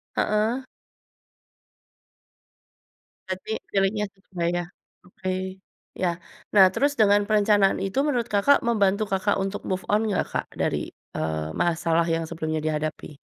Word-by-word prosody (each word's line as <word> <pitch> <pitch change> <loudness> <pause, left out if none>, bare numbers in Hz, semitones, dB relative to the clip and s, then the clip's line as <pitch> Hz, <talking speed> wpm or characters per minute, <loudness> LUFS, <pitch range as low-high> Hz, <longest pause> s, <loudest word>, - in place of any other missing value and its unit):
Heeh. 220 +5 +1 2.6
Berarti 190 +3 -5 0.2
pilihnya 205 +2 +2
sesuai 185 -3 -4
ya? 175 0 -1 0.4
Oke, 185 +1 -4 0.4
ya, 175 -2 0 0.4
nah 200 -2 +8
terus 285 +6 +2
dengan 205 -2 +4
perencanaan 205 -2 +4
itu 195 +8 0
menurut 245 -6 +1
Kakak 210 +8 +4
membantu 210 -2 +2
Kakak 195 +1 +1
untuk 195 +1 -3
move 185 0 -2
on 210 +1 +3
nggak 200 - 0
Kak - - -2
dari, - - -1 0.3
eee, 80 0 -2
masalah 165 - +1
yang 165 0 0
sebelumnya 160 -1 -2
dihadapi? 155 -1 -3
195 Hz, 120 wpm, -25 LUFS, 170-210 Hz, 2.6 s, nah